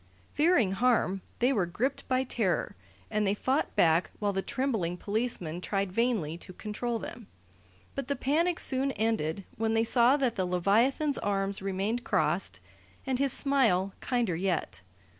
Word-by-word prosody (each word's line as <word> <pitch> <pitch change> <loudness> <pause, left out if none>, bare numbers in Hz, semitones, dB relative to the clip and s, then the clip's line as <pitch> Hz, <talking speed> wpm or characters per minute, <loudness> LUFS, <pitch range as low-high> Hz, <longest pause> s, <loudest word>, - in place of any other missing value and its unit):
Fearing 305 - +3
harm, 195 -3 +2 0.2
they 250 +3 +2
were 195 -7 +1
gripped 250 +10 -2
by 260 0 +2
terror, 215 -8 -1 0.4
and 210 -1 +1
they 195 - +2
fought 265 +7 -1
back 165 +1 +3
while 205 -1 -1
the 195 - 0
trembling 220 -9 -2
policemen 200 -6 -2
tried 195 0 -1
vainly 200 -8 0
to 185 - -10
control 225 +4 -3
them; 225 -1 -8 0.7
but 275 -3 -4
the 280 - 0
panic 320 +7 +1
soon 270 +1 +1
ended 205 -6 -1
when 225 0 0
they 225 - +3
saw 240 +4 +4
that 255 -5 0
the 185 - +1
leviathan's 230 - +2
arms 195 -1 -1
remained 195 +5 -2
crossed 155 - 0 0.5
and 260 -1 -1
his 275 -1 +2
smile 225 -11 +2
kinder 240 -8 0
yet. 175 - -2
220 Hz, 155 wpm, -29 LUFS, 190-255 Hz, 0.7 s, saw